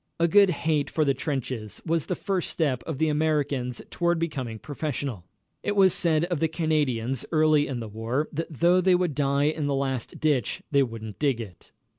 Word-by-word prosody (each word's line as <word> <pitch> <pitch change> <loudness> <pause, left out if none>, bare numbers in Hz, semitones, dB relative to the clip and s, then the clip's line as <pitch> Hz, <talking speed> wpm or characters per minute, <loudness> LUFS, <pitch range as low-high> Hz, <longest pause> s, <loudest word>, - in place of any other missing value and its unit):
A 170 - +4
good 200 +2 +6
hate 160 -4 0
for 155 - +1
the 140 - +3
trenches 130 -6 -4
was 165 -2 0
the 180 - -1
first 190 -2 -2
step 140 -7 0
of 160 -4 -3
the 160 - +2
Americans 145 -5 0
toward 175 -1 +1
becoming 135 -9 -3
professional. 140 - -4 0.4
It 205 - -1
was 190 -2 +5
said 165 -1 +2
of 175 -3 -2
the 160 - +2
Canadians 145 -7 0
early 155 -2 +4
in 125 -3 -4
the 110 - -5
war 115 +7 -2
that 165 +2 -4
though 175 +5 +3
they 185 0 +4
would 180 -3 0
die 140 0 +1
in 150 0 0
the 140 - 0
last 135 -3 -3
ditch 145 -7 0
they 140 -1 +4
wouldn't 115 -4 -4
dig 140 -5 +1
it. 100 -7 -10
150 Hz, 195 wpm, -26 LUFS, 130-165 Hz, 0.4 s, good